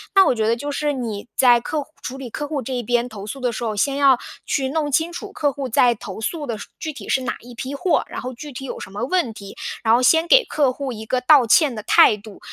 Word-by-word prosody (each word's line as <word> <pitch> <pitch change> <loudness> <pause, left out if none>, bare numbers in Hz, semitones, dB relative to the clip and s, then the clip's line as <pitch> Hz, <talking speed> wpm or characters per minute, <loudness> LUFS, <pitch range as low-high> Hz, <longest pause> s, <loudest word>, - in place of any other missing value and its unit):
那 385 -1 +7
我 - - +3
觉 220 -1 0
得 230 - +3
就 285 +5 -5
是 295 +1 -1
你 230 -6 -5
在 245 -2 +6
客 305 +5 -2
户 295 - -28
处 260 - -6
理 265 -2 -7
客 295 - -4
户 290 -2 -3
这 260 - -5
一 250 - -1
边 240 +2 +1
投 210 -4 -9
诉 245 +6 -6
的 250 -2 0
时 230 - -5
候， 220 -2 -2
先 270 +7 +1
要 275 -3 +5 0.3
去 265 -1 -1
弄 295 0 -1
清 325 +5 +1
楚 395 +3 -7
客 290 -6 0
户 275 -2 -5
在 240 +1 +4
投 205 -3 -8
诉 290 +6 -3
的 230 -3 -3
是 200 - -9
具 310 -2 -4
体 290 - -10
是 265 - +2
哪 255 - -3
一 245 +1 -12
批 260 +4 -5
货， 355 +5 +1
然 - - -6
后 255 +1 -5
具 290 +5 -9
体 270 +1 -7
有 - - -6
什 - - -8
么 200 - -5
问 310 -3 0
题， 200 -2 -10 0.3
然 225 -1 +4
后 240 - +4
先 320 +6 +4
给 - - +6
客 285 -9 +1
户 275 0 -4
一 220 -1 -8
个 250 +3 -1
道 270 -1 +6
歉 265 +3 +4
的 215 - -6
态 210 - +5
度。 210 -1 -13
255 Hz, 305 characters per minute, -21 LUFS, 230-290 Hz, 0.3 s, 那